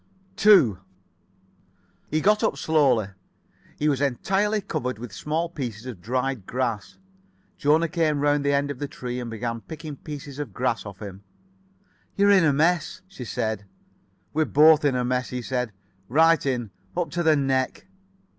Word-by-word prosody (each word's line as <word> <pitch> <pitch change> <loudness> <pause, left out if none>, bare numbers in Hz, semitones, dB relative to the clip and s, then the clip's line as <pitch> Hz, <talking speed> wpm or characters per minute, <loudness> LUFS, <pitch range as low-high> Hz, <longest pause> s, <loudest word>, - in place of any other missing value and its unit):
[Pg 210 +2 +3 0.2
64]2 90 - -16 1.3
He 155 +1 0
got 210 +4 +3
up - - +1
slowly. 135 -10 +2 0.7
He 150 - 0
was 140 -2 +1
entirely 195 - +1
covered 125 - -3
with 115 -2 -8
small 155 - -2
pieces 125 -9 -6
of 120 -9 -8
dried 125 0 -2
grass. 120 -4 -3 0.6
Jona 155 +3 +3
came 160 -3 0
round 145 0 +2
the 140 - +2
end 140 0 +1
of 135 - -8
the 145 - -3
tree 125 -3 -5
and 120 -1 -5
began 115 0 -4
picking 155 -1 -8
pieces 145 -1 -8
of 145 - -5
grass 120 -3 -1
off 100 +1 -9
him. 100 -1 -8 0.9
"You're 200 0 +4
in 190 -4 +5
a 150 - +4
mess," 160 +5 +1
she 135 -10 -9
said. 110 -3 -3 0.7
"We're 155 +1 +2
both 155 +1 +6
in 140 -3 +2
a 125 -1 0
mess," 125 0 -1
he 125 -1 -4
said. 125 -2 -2 0.4
"Right 165 +5 +4
in. 120 -6 -2 0.3
Up 175 -2 -1
to 175 - -1
the 160 -2 +4
neck." 135 -2 0
140 Hz, 165 wpm, -25 LUFS, 120-155 Hz, 1.3 s, both